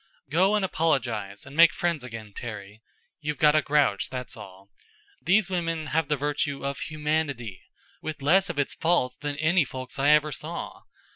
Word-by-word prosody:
"Go 190 +6 +4
and 205 -2 +2
apologize 120 - -1
and 135 - -11
make 165 0 +7
friends 170 -6 -1
again, 115 -4 -8
Terry. 105 -2 -8 0.4
You've 150 -1 -3
got 150 -3 +5
a 155 - +4
grouch, 140 -9 +2
that's 125 -2 -5
all. 100 -2 -13 0.5
These 200 +2 +3
women 165 -4 -2
have 160 -1 +2
the 150 0 0
virtue 145 0 -1
of 140 0 -3
humanity, 150 -8 -2 0.4
with 155 -3 -6
less 190 +7 +4
of 175 - -4
its 145 - 0
faults 160 -6 +1
than 145 -1 -4
any 155 +3 +3
folks 130 0 -7
I 140 +2 +3
ever 150 0 +4
saw. - - -6
145 Hz, 170 wpm, -26 LUFS, 125-160 Hz, 0.5 s, make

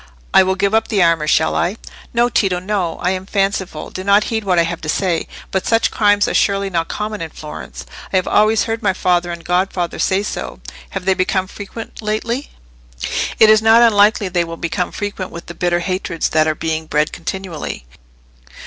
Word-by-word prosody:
I - - +8
will 190 0 +1
give 200 +2 0
up 220 0 +2
the 205 -5 +2
armour—shall 160 -1 +2
I?" 185 +6 0 0.3
"No, 240 0 +3
Tito, 195 -6 +1
no. 185 -2 -2
I 180 - +2
am 190 0 -4
fanciful. 195 -6 -1
Do 185 - -6
not 200 +2 +4
heed 220 -1 0
what 185 -3 +1
I 170 - +5
have 165 0 -3
said. 170 +2 0 0.2
But 190 - -1
such 225 0 +2
crimes 205 -1 +3
are - - -1
surely 200 -1 +1
not 165 -2 0
common 210 -1 -4
in 165 - -4
Florence? 150 0 -9 0.3
I - - -2
have 185 - +2
always 215 +1 +3
heard 225 0 -3
my 195 -3 +2
father 180 -1 +1
and 170 -1 -8
godfather 180 -1 -1
say 195 +1 +1
so. 65 - -5 0.3
Have 180 - -5
they 190 - +4
become 185 0 0
frequent 205 +4 -9
lately?" 230 +5 -2 0.9
"It 220 -1 +8
is 215 0 +5
not 225 +2 +6
unlikely 210 -2 +4
they 175 -1 +1
will 165 0 -7
become 175 +2 -2
frequent, 205 -3 -4
with 170 - -9
the 170 - -8
bitter 175 0 0
hatreds 185 -2 -2
that 155 0 +2
are 155 - +1
being 160 0 -3
bred 150 0 +1
continually." 175 - -5
190 Hz, 195 wpm, -18 LUFS, 170-210 Hz, 0.9 s, I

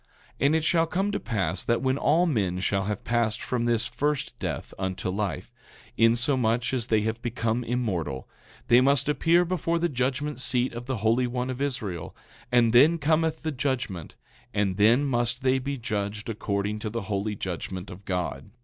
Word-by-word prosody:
9:15 - - +1
And 155 - +3
it 160 - +1
shall 165 +1 +3
come 195 +5 0
to - - -1
pass 100 -5 -1
that 120 +2 0
when 130 +1 +1
all 165 +4 +3
men 100 - 0
shall 95 +1 0
have 105 -1 -3
passed 115 -2 0
from 120 -2 -2
this 120 -1 +1
first 145 +3 -2
death - - -4
unto 95 -1 -2
life, 100 +2 -3 0.4
insomuch 120 +1 +2
as 120 -3 -1
they 110 -3 +3
have 110 +2 -2
become 120 -1 -1
immortal, 95 - -2 0.4
they 120 +1 +6
must 140 0 +3
appear 165 +4 +3
before 170 -1 0
the 170 +1 +1
judgment 140 +1 -2
seat 125 -1 +1
of 120 +1 -7
the 130 -2 -1
Holy 120 +3 +3
One 125 +1 -2
of 130 +1 -6
Israel; 105 - -3 0.4
and 120 -2 +4
then 150 +8 +6
cometh 160 +1 +1
the 160 - -1
judgment, 130 - -3 0.4
and 100 -2 +1
then 115 +7 +5
must 120 -1 0
they 130 0 +3
be 140 +2 -3
judged 105 -2 -3
according 105 -1 -2
to 110 - -3
the 115 0 -4
holy 105 +1 -2
judgment 95 0 -5
of 90 +3 -11
God. 90 +1 -3
120 Hz, 185 wpm, -26 LUFS, 105-135 Hz, 0.4 s, they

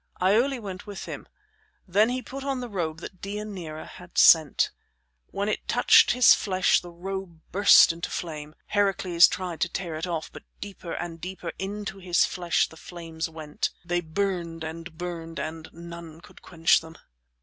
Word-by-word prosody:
Iole 235 +8 +3
went 195 -3 -8
with 205 -1 -7
him. - - -7 0.6
Then 205 +5 +3
he 250 0 -2
put 270 +5 -7
on 275 -2 -2
the 250 - -5
robe 165 -6 -3
that 185 0 -9
Deianira 195 -6 -6
had 180 -1 -13
sent. 155 -4 +6 0.6
When 200 +1 -3
it 215 - -2
touched - - +6
his 250 -1 +7
flesh 185 -2 +2
the 175 - -10
robe 180 -1 -6
burst 195 -2 +7
into 170 0 -5
flame. 155 -2 -6
Heracles 195 -4 +4
tried 180 -3 -5
to 175 - +2
tear 175 -2 -4
it 160 +3 -3
off, 165 -3 -3
but - - -9 0.2
deeper 195 -4 -7
and 165 -1 -5
deeper 180 -1 -5
into 200 0 -5
his 180 -2 +3
flesh 175 -2 0
the 160 - -15
flames 165 -1 -6
went. 155 -2 -3 0.2
They 175 0 0
burned 170 -1 -2
and 165 +1 -7
burned 165 -1 -6
and 160 0 -5
none 170 -1 -10
could - - -17
quench 165 -1 +3
them. 160 0 -12
175 Hz, 170 wpm, -26 LUFS, 165-195 Hz, 0.6 s, his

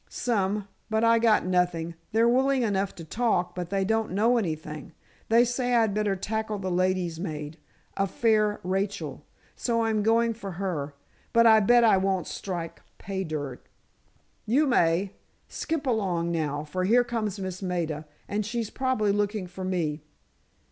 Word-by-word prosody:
"Some. 205 -4 -1 0.2
But 220 +1 +1
I 230 0 +5
got 225 -4 +3
nothing. 180 -2 0 0.2
They're 225 +2 +4
willing 260 +2 +3
enough 200 -3 0
to 170 - -9
talk, 180 -3 0
but 175 -1 -5
they 195 0 0
don't 220 -2 0
know 230 +5 +3
anything. 155 -7 -4 0.4
They 230 +2 +5
say 245 0 0
I'd 225 -3 +3
better 210 -1 0
tackle 215 +2 -3
the 190 -2 -3
ladies' 180 -2 0
maid, 155 -3 -5 0.4
a 195 - +1
fair 215 0 +2
Rachel. 195 +2 -2 0.3
So 230 -2 0
I'm 220 -1 +1
going 230 +2 +3
for 200 -4 -7
her. 170 -6 -3 0.4
But 230 0 +5
I 220 -1 +8
bet 240 +3 +5
I 220 -4 +5
won't 190 -1 0
strike 175 -4 -5 0.2
pay 190 0 -4
dirt." 145 -6 -5 0.8
"You 275 +8 +3
may. 185 - +2 0.4
Skip 320 -3 -3
along, 185 -9 0
now, 150 -3 -1
for 185 +5 -3
here 240 +5 +5
comes 220 -4 -3
Miss 185 -1 -5
Maida, 165 -5 -3 0.2
and 210 +1 -1
she's 220 +1 -3
probably 260 -6 +1
looking 205 -1 -1
for 180 +1 -8
me." 165 -5 -1
200 Hz, 160 wpm, -27 LUFS, 180-225 Hz, 0.8 s, I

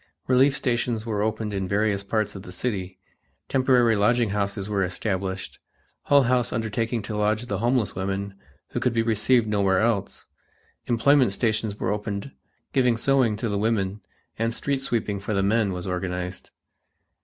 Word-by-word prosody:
Relief 135 +2 +4
stations 120 -4 -1
were 105 -3 -1
opened 110 0 -1
in 95 -1 -2
various 100 0 +1
part 105 +1 -1
of 95 - -8
the 90 - -10
city, 95 -2 -3 0.5
temporary 125 -3 +3
lodging 115 +1 +2
houses 100 -1 -2
were 100 -2 0
established, 95 0 -3 0.5
Hull 140 -1 +5
House 125 -1 +1
undertaking 115 0 -2
to 105 - -5
lodge 105 +2 0
the 100 -5 -3
homeless 120 -2 +1
women 95 +1 -3 0.4
who - - -3
could 125 - +1
be 115 -1 +2
received 115 +2 +3
nowhere 100 -3 +2
else; 110 -3 -1 0.6
employment 125 -1 +4
stations 110 -1 -1
were - - 0
opened 105 +4 -4 0.4
giving 125 -4 +3
sewing 130 -4 +2
to 120 - -2
the 100 -2 -1
women, 105 -2 0 0.4
and 115 0 0
street 140 0 -1
sweeping 110 -6 -1
for 100 +2 -3
the 95 - +2
men 105 0 +2
was 90 -1 -5
organized. 90 0 -4
110 Hz, 160 wpm, -25 LUFS, 100-120 Hz, 0.6 s, Hull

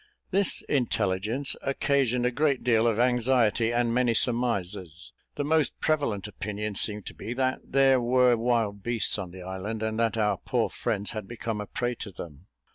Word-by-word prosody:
This 195 0 +5
intelligence 115 0 0
occasioned 135 -3 0
a 125 - +1
great 140 0 0
deal 115 -1 +3
of 115 -2 +1
anxiety, 120 -2 +2
and 120 -1 0
many 120 -1 +2
surmises. 100 -8 0 0.2
The 145 - -2
most 155 +1 +1
prevalent 130 - -1
opinion 105 +1 -5
seemed 105 0 +2
to - - -7
be 120 - -6
that 130 0 0
there 135 -1 +3
were 125 0 +3
wild 115 -3 -1
beasts 115 -1 0
on 95 -3 -5
the 90 +1 -10
island, 95 +4 -5
and 110 0 -2
that 115 0 0
our 105 -3 +1
poor - - -1
friends 100 +1 -2
had 110 -3 -6
become 115 -2 -4
a 105 - -7
prey 120 +3 -2
to 100 - -7
them. 85 -1 -11
115 Hz, 175 wpm, -27 LUFS, 105-125 Hz, 0.2 s, This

